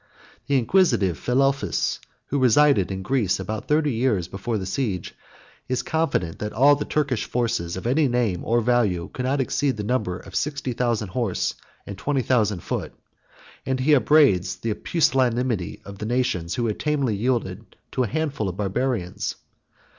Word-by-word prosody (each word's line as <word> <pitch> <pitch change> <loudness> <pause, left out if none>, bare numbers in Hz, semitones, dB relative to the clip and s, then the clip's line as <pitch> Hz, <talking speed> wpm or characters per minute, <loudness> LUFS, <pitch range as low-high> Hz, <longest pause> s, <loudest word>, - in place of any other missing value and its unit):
The 140 -1 +3
inquisitive 115 - +3
Philelphus, 135 - 0 0.3
who 140 - 0
resided 130 -5 +4
in 95 0 -4
Greece 110 -5 +1
about 105 +3 -5
thirty 150 -2 +2
years 110 -7 +1
before 100 +5 -3
the 95 - -4
siege, 95 -2 -2 0.6
is 130 - 0
confident, 140 - -1
that 105 0 -4
all 140 +5 +6
the 145 - -4
Turkish 140 -6 0
forces 100 -8 -1
of 95 - -7
any 140 +5 +3
name 120 -8 0
or 120 +1 +2
value 110 -8 +1
could 125 - -3
not 140 +2 +1
exceed 135 0 0
the 105 - -3
number 105 -6 -1
of - - -13
sixty 140 -4 -2
thousand 115 -4 -1
horse 115 -3 -1 0.3
and 100 -1 -8
twenty 140 -3 0
thousand 105 -8 +1
foot; - - -4 0.7
and 130 -1 -1
he 150 +4 +4
upbraids 135 - +4
the 115 -2 -2
pusillanimity 125 - 0
of 100 0 -10
the 105 - -4
nations, 110 -9 -1
who 120 -2 -1
had 110 -2 -2
tamely 140 -7 0
yielded 110 -3 -2 0.2
to 130 - -1
a 125 - +1
handful 145 -6 -2
of 90 - -7
Barbarians. 105 -2 -2
120 Hz, 165 wpm, -24 LUFS, 100-135 Hz, 0.7 s, all